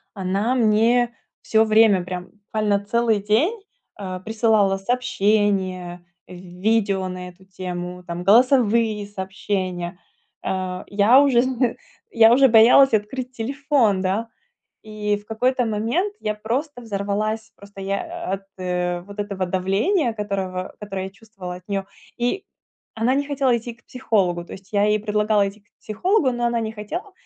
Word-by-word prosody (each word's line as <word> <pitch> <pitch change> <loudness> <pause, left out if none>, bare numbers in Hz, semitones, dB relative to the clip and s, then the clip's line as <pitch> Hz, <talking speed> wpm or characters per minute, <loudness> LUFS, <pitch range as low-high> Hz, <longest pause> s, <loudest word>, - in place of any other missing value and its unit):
она 200 +6 0
мне 235 +1 +3 0.3
всё 220 0 +3
время, 215 -4 +4
прям 180 0 -6
буквально 210 0 -1
целый 230 0 +1
день, 290 - +1 0.4
э, 185 -2 -5
присылала 215 -3 +2
сообщения, 195 -6 0 0.2
в - - -15
видео 190 +2 -1
на 180 0 -6
эту 180 +1 -19
тему, 180 -1 -6
там 170 +1 -5
голосовые 230 -1 +3
сообщения. 190 -3 -4 0.4
А, 185 -1 -3
я 210 +6 +5
уже 255 -4 +4
зн 255 -1 0 0.4
я 225 - +6
уже 270 +2 +6
боялась 240 +3 +6
открыть 245 +5 -3
телефон, 260 -4 +1
да, 195 +5 -1 0.6
и 210 -1 -2
в 205 - -12
какой-то 250 +3 0
момент 230 - -1
я 215 0 -2
просто 245 +5 -3
взорвалась, 215 +1 -2
просто 200 -1 -13
я 330 - -4
от, 195 - -7 0.2
э, 180 -1 -2
вот 200 +3 -13
этого 200 -2 -2
давления, 205 - +1
которого 195 -3 -4
которое 195 -2 -5
я - - -8
чувствовала 195 -3 -9
от 180 - -15
нее, 195 -1 -2 0.3
и 245 +12 -1 0.5
она 230 +3 +1
не 285 0 0
хотела 270 -4 +1
идти 235 0 -6
к 235 - -30
психологу. 190 -9 0
То - - -12
есть 195 +2 -12
я 205 0 +3
ей 210 0 +2
предлагала 210 -1 +1
идти 200 +2 -12
к 205 - -40
психологу, 285 - +1
но 240 0 -2
она 235 -1 0
не 220 -1 -3
хотела, 320 - -6
210 Hz, 150 wpm, -22 LUFS, 190-235 Hz, 0.6 s, я